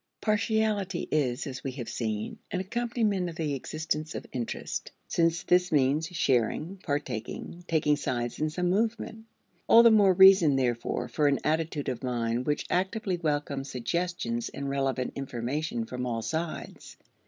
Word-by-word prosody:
Partiality 210 Hz, -3 st, 0 dB
is, 135 Hz, -3 st, +1 dB
as 130 Hz, -3 st, -6 dB
we 135 Hz, -, -3 dB
have 125 Hz, -4 st, -6 dB
seen, 110 Hz, -2 st, -3 dB
an 185 Hz, -, -2 dB
accompaniment 215 Hz, -2 st, -1 dB
of 165 Hz, -, -8 dB
the 155 Hz, -4 st, -1 dB
existence 155 Hz, +3 st, -3 dB
of -, -, -5 dB
interest, 120 Hz, -3 st, -4 dB, 0.2 s
since 165 Hz, 0 st, +1 dB
this 180 Hz, 0 st, +3 dB
means 145 Hz, +2 st, +2 dB
sharing, 155 Hz, -, 0 dB
partaking, 145 Hz, -, -4 dB
taking 150 Hz, -2 st, +2 dB
sides 120 Hz, -4 st, -3 dB
in 155 Hz, +1 st, +1 dB
some 180 Hz, +3 st, 0 dB
movement. 220 Hz, +2 st, -1 dB, 0.4 s
All 230 Hz, -, +8 dB
the 230 Hz, -, +8 dB
more 205 Hz, -3 st, +6 dB
reason, 190 Hz, -5 st, +7 dB
therefore, 120 Hz, -1 st, -1 dB
for 150 Hz, +2 st, +1 dB
an 140 Hz, -1 st, +3 dB
attitude 155 Hz, -1 st, -1 dB
of 125 Hz, -2 st, -2 dB
mind 120 Hz, -1 st, -1 dB
which 150 Hz, -, 0 dB
actively 190 Hz, +1 st, 0 dB
welcomes 145 Hz, -4 st, -2 dB
suggestions 125 Hz, -3 st, -2 dB
and 140 Hz, 0 st, -5 dB
relevant 135 Hz, -2 st, -1 dB
information 130 Hz, 0 st, -3 dB
from 125 Hz, +1 st, -4 dB
all 115 Hz, -2 st, -2 dB
sides. 160 Hz, +4 st, -5 dB
155 Hz, 150 wpm, -28 LUFS, 130-180 Hz, 0.4 s, All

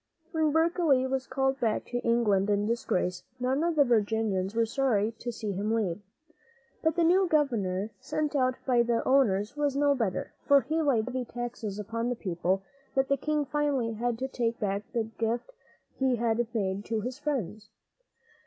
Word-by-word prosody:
When 315 Hz, -2 st, +2 dB
Berkeley 320 Hz, -4 st, +3 dB
was 260 Hz, 0 st, -2 dB
called 270 Hz, 0 st, 0 dB
back 225 Hz, -3 st, 0 dB
to 245 Hz, -, -3 dB
England 225 Hz, -5 st, +2 dB
in 205 Hz, 0 st, +2 dB
disgrace, 185 Hz, -5 st, -1 dB, 0.2 s
none 260 Hz, +4 st, +1 dB
of 340 Hz, -1 st, +1 dB
the 290 Hz, -, +6 dB
Virginians 215 Hz, -4 st, +1 dB
were 230 Hz, 0 st, +3 dB
sorry 225 Hz, -3 st, +1 dB
to 240 Hz, -, -4 dB
see 215 Hz, -2 st, -4 dB
him 200 Hz, +3 st, -2 dB
leave. 210 Hz, -5 st, 0 dB, 0.8 s
But 320 Hz, -1 st, +1 dB
the 345 Hz, -, +2 dB
new 365 Hz, +3 st, +4 dB
governor 220 Hz, -, +1 dB
sent 300 Hz, -1 st, -2 dB
out 255 Hz, -2 st, +2 dB
by 245 Hz, -3 st, +4 dB
the 235 Hz, -1 st, 0 dB
owners 225 Hz, -4 st, +3 dB
was 290 Hz, -2 st, 0 dB
no 285 Hz, 0 st, +3 dB
better, 225 Hz, -9 st, -2 dB
for 280 Hz, -1 st, +6 dB
he 315 Hz, +5 st, -1 dB
laid 255 Hz, -8 st, +2 dB
such 255 Hz, -, -6 dB
heavy 255 Hz, -1 st, -2 dB
taxes 235 Hz, -4 st, -5 dB
upon 230 Hz, +3 st, -3 dB
the 245 Hz, -, -1 dB
people 185 Hz, -1 st, -1 dB, 0.3 s
that 270 Hz, 0 st, +2 dB
the 275 Hz, -, +4 dB
king 300 Hz, +2 st, -1 dB
finally 280 Hz, -5 st, 0 dB
had 235 Hz, +1 st, -1 dB
to 260 Hz, +2 st, -2 dB
take 235 Hz, -3 st, -2 dB
back 200 Hz, -1 st, -2 dB
the 230 Hz, -, 0 dB
gift 225 Hz, -, -3 dB, 0.5 s
he 265 Hz, -2 st, +3 dB
had 235 Hz, 0 st, 0 dB
made 200 Hz, -3 st, -1 dB
to 225 Hz, -1 st, -1 dB
his 250 Hz, +5 st, -5 dB
friends. 215 Hz, -, -3 dB
240 Hz, 180 wpm, -29 LUFS, 215-275 Hz, 0.8 s, the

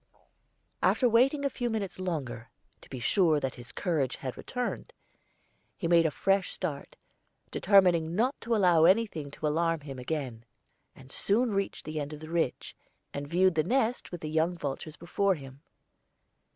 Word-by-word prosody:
After 255 Hz, -, +3 dB
waiting 265 Hz, +5 st, +3 dB
a -, -, +2 dB
few 245 Hz, -2 st, -2 dB
minutes 205 Hz, -5 st, -3 dB
longer, 130 Hz, -11 st, -4 dB, 0.3 s
to -, -, -17 dB
be 130 Hz, -, -6 dB
sure 160 Hz, -, +3 dB
that 135 Hz, -2 st, -2 dB
his 120 Hz, -1 st, -10 dB
courage 150 Hz, -, -1 dB
had 130 Hz, -2 st, -6 dB
returned, 250 Hz, -1 st, -4 dB, 0.8 s
he 170 Hz, -, -2 dB
made 170 Hz, -1 st, +5 dB
a -, -, +1 dB
fresh 195 Hz, +5 st, +1 dB
start, 155 Hz, -7 st, -4 dB, 0.6 s
determining 175 Hz, -4 st, +4 dB
not 245 Hz, +7 st, +2 dB
to 235 Hz, 0 st, 0 dB
allow 175 Hz, -6 st, +5 dB
anything 185 Hz, -6 st, +2 dB
to 145 Hz, -, -6 dB
alarm 165 Hz, +1 st, +1 dB
him 135 Hz, -3 st, -8 dB
again; 125 Hz, -4 st, -4 dB, 0.5 s
and 130 Hz, 0 st, -15 dB
soon 230 Hz, +4 st, +2 dB
reached 195 Hz, -1 st, -2 dB
the 155 Hz, 0 st, -4 dB
end 145 Hz, +1 st, -4 dB
of 150 Hz, -, -8 dB
the 155 Hz, +1 st, -9 dB
ridge, 165 Hz, -7 st, -1 dB, 0.4 s
and 140 Hz, 0 st, -4 dB
viewed 185 Hz, +4 st, +3 dB
the 160 Hz, -, +2 dB
nest 245 Hz, -, 0 dB
with 175 Hz, -, -6 dB
the 155 Hz, -, -4 dB
young 160 Hz, +3 st, +1 dB
vultures 150 Hz, +1 st, -5 dB
before 195 Hz, +3 st, 0 dB
him. 135 Hz, -2 st, -11 dB
165 Hz, 165 wpm, -29 LUFS, 145-195 Hz, 0.8 s, made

